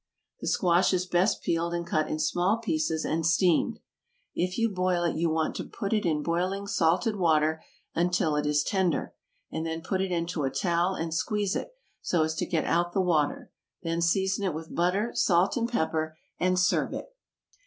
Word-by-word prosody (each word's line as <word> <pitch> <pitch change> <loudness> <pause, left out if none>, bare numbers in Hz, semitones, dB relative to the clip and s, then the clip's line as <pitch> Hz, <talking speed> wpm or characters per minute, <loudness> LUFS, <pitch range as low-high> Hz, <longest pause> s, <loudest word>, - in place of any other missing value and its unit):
The - - -6
squash 180 +1 +3
is 180 0 0
best 180 +3 +1
peeled 170 +1 0
and 170 0 -3
cut 155 -2 0
in - - -1
small 175 +7 +1
pieces 230 - -1
and 165 +1 -1
steamed. 175 +1 +2 0.6
If 180 +1 -1
you 230 0 +3
boil 185 -3 0
it 170 - 0
you 165 +1 +1
want 160 0 0
to - - -3
put 200 -1 -4
it 210 -4 +1
in 150 -2 0
boiling 185 +5 -1
salted 185 +3 +1
water 160 -3 +2 0.3
until 170 -3 +1
it 150 0 0
is 150 0 +2
tender, 185 -3 0 0.4
and 160 - -3
then 165 0 -4
put 190 +2 -1
it 190 -1 -2
into 170 -1 -1
a 135 - +1
towel 175 +5 0
and 165 -2 -3
squeeze 205 +3 0
it, - - -4 0.3
so 170 -3 +1
as 160 0 -1
to - - -1
get 165 -4 0
out 175 +1 +1
the - - +1
water; 160 -5 0 0.3
then 165 0 -1
season 190 +3 +1
it 185 -6 -1
with 160 0 -7
butter, 190 +7 +1
salt 175 +1 +3
and 235 -1 0
pepper, 160 -7 -1 0.2
and 185 0 +2
serve 180 0 +2
it. - - -8
175 Hz, 195 wpm, -28 LUFS, 160-190 Hz, 0.6 s, squash